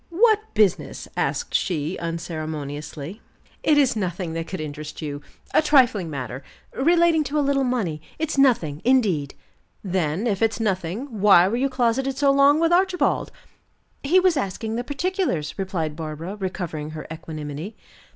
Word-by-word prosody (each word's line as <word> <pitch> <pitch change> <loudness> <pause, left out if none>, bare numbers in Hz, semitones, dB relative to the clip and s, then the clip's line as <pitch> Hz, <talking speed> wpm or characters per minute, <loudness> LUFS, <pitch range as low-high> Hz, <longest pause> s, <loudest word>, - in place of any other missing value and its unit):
"What 430 +4 +3
business?" 210 -5 +1
asked - - -1
she 165 -1 0
unceremoniously. 155 0 -5 0.4
"It 300 - +3
is 275 -4 +4
nothing 180 -4 -3
that 165 0 -4
could 185 - -5
interest 150 0 -6
you. 145 -2 -5 0.3
A - - +5
trifling 250 - +3
matter, 130 -3 -5 0.3
relating 335 +2 +3
to 285 +3 -2
a 290 - +2
little 275 -1 +2
money. 210 - -1 0.2
It's 320 0 -2
nothing, 225 - +2
indeed." 205 - +2 0.5
"Then, 180 0 -1
if 205 -4 0
it's 225 0 +1
nothing, 210 - -2
why 195 -3 +7
were 210 - -1
you 270 +3 +1
closeted 260 +1 0
so 280 -1 +4
long 280 +2 +5
with 330 +1 +3
Archibald?" 370 0 +2 0.7
"He 335 +7 +4
was 365 -4 +3
asking 220 -1 -3
the 240 - -2
particulars," 285 - -1
replied 170 -6 -2
Barbara, 160 +4 -6
recovering 175 -6 -4
her - - -7
equanimity. 155 +4 -7
200 Hz, 150 wpm, -23 LUFS, -, 0.7 s, why